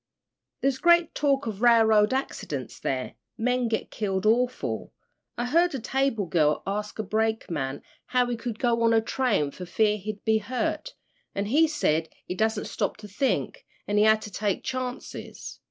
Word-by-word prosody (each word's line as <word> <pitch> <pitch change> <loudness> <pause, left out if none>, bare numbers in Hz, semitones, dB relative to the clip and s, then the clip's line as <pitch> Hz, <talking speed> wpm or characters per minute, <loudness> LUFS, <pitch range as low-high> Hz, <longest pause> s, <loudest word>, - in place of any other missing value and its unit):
"There's 270 -1 +1
great 345 -1 +4
talk 280 -3 +1
of 215 -2 -5
railroad 220 -3 +5
accidents 150 - -3
there. 130 -1 -2 0.2
Men 250 +1 +1
get 220 -1 -2
killed 195 -2 -2
awful. 245 +3 0 0.4
I 240 - -1
heard 335 +5 +3
a - - -2
table 265 -3 0
girl 155 -3 +2
ask 210 +2 -3
a 215 - -2
brakeman 195 -10 -1 0.2
how 250 -1 +2
he 245 0 -2
could 230 -1 -5
go 235 -1 +1
on 230 0 +4
a 225 - +4
train 220 - 0
for 180 +3 -8
fear 210 +3 +2
he'd 210 +1 -7
be 220 0 +3
hurt, 255 - -3 0.4
an' 200 - -1
he 300 +10 +4
said 160 - 0 0.2
he - - -4
dassent 220 +2 0
stop - - -2
to 210 -1 -10
think, 205 +7 -1 0.2
he 205 0 +2
had 220 0 +4
to 210 - -8
take 200 0 -1
chances. 255 0 -6
220 Hz, 170 wpm, -26 LUFS, 205-250 Hz, 0.4 s, railroad